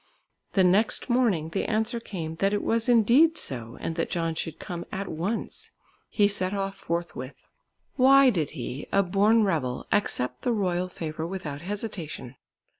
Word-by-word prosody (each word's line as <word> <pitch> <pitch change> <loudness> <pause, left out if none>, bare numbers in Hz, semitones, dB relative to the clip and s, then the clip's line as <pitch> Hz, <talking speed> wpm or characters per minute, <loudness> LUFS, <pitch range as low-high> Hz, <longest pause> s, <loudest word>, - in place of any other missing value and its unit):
The 190 - +4
next 205 +7 +3
morning 215 -11 +2
the 195 - -2
answer 220 +2 0
came 165 -8 -6
that 195 +3 +1
it 205 - 0
was 230 +1 +1
indeed 245 +8 +5
so 120 -3 -4
and 165 - -3
that 165 - -1
John 165 -2 -1
should 160 0 -4
come 175 -1 -6
at 195 +1 -4
once. 180 +9 -4 0.4
He 205 -2 +3
set 195 -1 -1
off 195 0 -2
forthwith. 170 -8 -5 0.5
Why 270 0 +7
did 160 - -1
he, 130 +3 -5
a 200 - +4
born 205 +4 +3
rebel, 145 -10 -1
accept 125 -11 0
the 245 - 0
royal 185 -4 0
favour 160 -2 -5
without 155 -6 -5
hesitation? 180 - -5
190 Hz, 160 wpm, -26 LUFS, 160-215 Hz, 0.5 s, Why